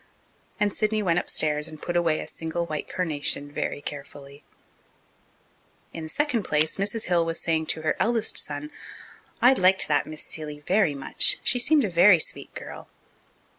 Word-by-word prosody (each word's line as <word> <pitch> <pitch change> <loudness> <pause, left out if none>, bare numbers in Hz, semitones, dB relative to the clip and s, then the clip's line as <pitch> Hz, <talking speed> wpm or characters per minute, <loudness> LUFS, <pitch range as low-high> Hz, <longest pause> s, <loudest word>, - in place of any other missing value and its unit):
And 205 -1 +1
Sidney 215 0 0
went 175 -2 +2
upstairs 150 -2 0
and 155 - -10
put 175 - -4
away 165 -3 +2
a - - -8
single 165 +1 -4
white 155 -2 -5
carnation 145 -4 0
very 145 - -3
carefully. 140 0 -9 1.5
In 165 - -6
the 160 - -7
second 290 - 0
place, 155 -3 0
Mrs. 205 +3 -1
Hill 175 -2 +2
was 165 0 -3
saying 160 -1 -1
to 160 - -2
her 155 - +1
eldest 230 -1 +1
son, 150 +1 -6 0.7
"I 250 +2 +7
liked 190 -5 +3
that 145 - +1
Miss 155 0 -6
Seeley 150 -2 -5
very 180 0 +1
much. 135 - +2
She 245 - +3
seemed 285 +3 +4
a - - -2
very 175 +2 +6
sweet 160 - -4
girl." - - -9
165 Hz, 170 wpm, -25 LUFS, 150-200 Hz, 1.5 s, I